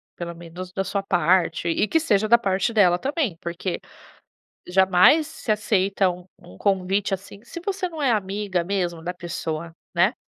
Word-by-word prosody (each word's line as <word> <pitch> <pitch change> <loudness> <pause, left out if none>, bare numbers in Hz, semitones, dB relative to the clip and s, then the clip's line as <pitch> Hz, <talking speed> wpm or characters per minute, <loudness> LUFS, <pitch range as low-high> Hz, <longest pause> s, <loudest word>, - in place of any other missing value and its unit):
pelo 170 -1 -5
menos 175 +2 -9
da 195 +1 -2
sua 195 +1 -2
parte, 175 -2 +2
e 170 +5 +1
que 325 - +3
seja 215 -10 +2
da 235 +2 +7
parte 195 0 0
dela 185 -5 +5
também, 270 - -1
porque 170 +1 -4 0.9
jamais 190 - +5
se 315 -7 -4
aceita 200 -2 +2
um 180 0 -11
um 90 - -15
convite, 195 - 0
assim, 200 +2 -14
se 240 +8 -8
você 385 -2 -2
não 320 -3 -7
é 270 -4 +3
amiga 200 -3 -1
mesmo 175 -3 -2
da 180 +2 -3
pessoa, 170 -2 -5 0.2
né. 180 +7 +4
190 Hz, 170 wpm, -23 LUFS, 175-210 Hz, 0.9 s, da